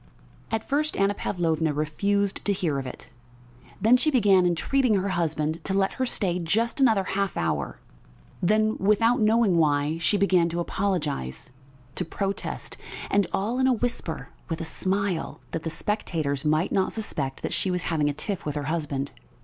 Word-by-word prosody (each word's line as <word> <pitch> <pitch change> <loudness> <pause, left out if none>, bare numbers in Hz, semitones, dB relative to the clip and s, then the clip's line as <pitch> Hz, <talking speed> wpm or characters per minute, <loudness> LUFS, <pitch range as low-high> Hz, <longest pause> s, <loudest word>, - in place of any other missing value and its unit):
At 225 -1 -2
first 300 +2 0
Anna 195 +1 +3
Pavlovna 165 -6 0
refused 200 +7 0
to 205 - +2
hear 170 -8 -1
of 135 - -5
it, - - -9 0.7
then 225 +5 +5
she 310 - +2
began 200 -9 +4
entreating 235 +7 +2
her 195 +1 0
husband 160 -3 -1
to 195 - 0
let 195 0 +2
her 255 - +2
stay 180 -6 0
just 225 - 0
another 220 -7 +4
half 195 0 -1
hour; 75 -5 -1 0.6
then, 215 +4 +2
without 225 +5 +3
knowing 215 -4 +4
why, 150 +1 +2
she 205 +5 +2
began 185 -4 +3
to 170 +1 -3
apologise, 150 - -2 0.4
to - - -2
protest 195 +4 -4 0.3
and 200 -2 +3
all 225 +6 -1
in 260 - +4
a 260 - +4
whisper, 235 -8 -3 0.2
with 165 0 -2
a 165 - -3
smile, 190 +1 -1
that 165 - -3
the 160 - -3
spectators 160 -8 -2
might 155 +3 +1
not 190 -1 +1
suspect 135 -11 -3
that - - -2
she 190 - +1
was 180 -1 0
having 150 -3 +1
a - - -1
tiff 190 +6 -3
with 150 -1 -3
her 145 - -2
husband. 140 -4 -2
185 Hz, 175 wpm, -26 LUFS, 160-210 Hz, 0.7 s, then